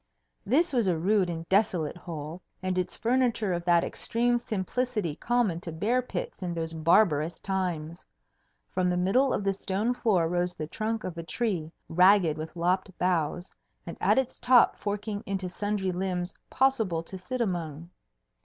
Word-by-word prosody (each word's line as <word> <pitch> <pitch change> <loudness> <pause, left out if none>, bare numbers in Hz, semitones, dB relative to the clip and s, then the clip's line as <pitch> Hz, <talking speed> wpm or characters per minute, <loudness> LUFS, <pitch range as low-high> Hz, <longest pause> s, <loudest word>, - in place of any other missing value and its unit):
This 295 - +3
was 235 -6 +2
a 175 -3 +2
rude 190 +2 +2
and 165 -1 -5
desolate 185 -7 +1
hole, 165 -1 -7 0.2
and 185 0 0
its 180 -1 -1
furniture 235 -5 +1
of 175 0 -2
that 170 -1 +4
extreme 240 +1 0
simplicity 215 - -2
common 235 -5 +1
to 170 - -6
bear 215 +11 +1
pits 250 - -5
in 175 -2 -3
those 165 -1 -3
barbarous 165 -1 +3
times. 175 -4 -3 0.7
From 180 -1 +1
the 180 - +1
middle 245 +10 +3
of - - -1
the 195 0 +1
stone 200 +5 -1
floor 200 -9 +2
rose 175 +1 -1
the 155 - -4
trunk 220 +7 -3
of 175 -2 -5
a - - -4
tree, 175 -4 -2 0.2
ragged 180 -2 +5
with 155 +2 -7
lopped 180 +3 +1
boughs 175 0 -1 0.3
and - - -6
at - - +3
its 265 -2 0
top 245 -1 +5
forking 205 0 -3
into 195 -1 -2
sundry 200 +1 -2
limbs 180 0 -2 0.2
possible 220 -11 +1
to 190 - -7
sit 190 +8 -5
among. 170 -6 -3
185 Hz, 165 wpm, -28 LUFS, 170-215 Hz, 0.7 s, ragged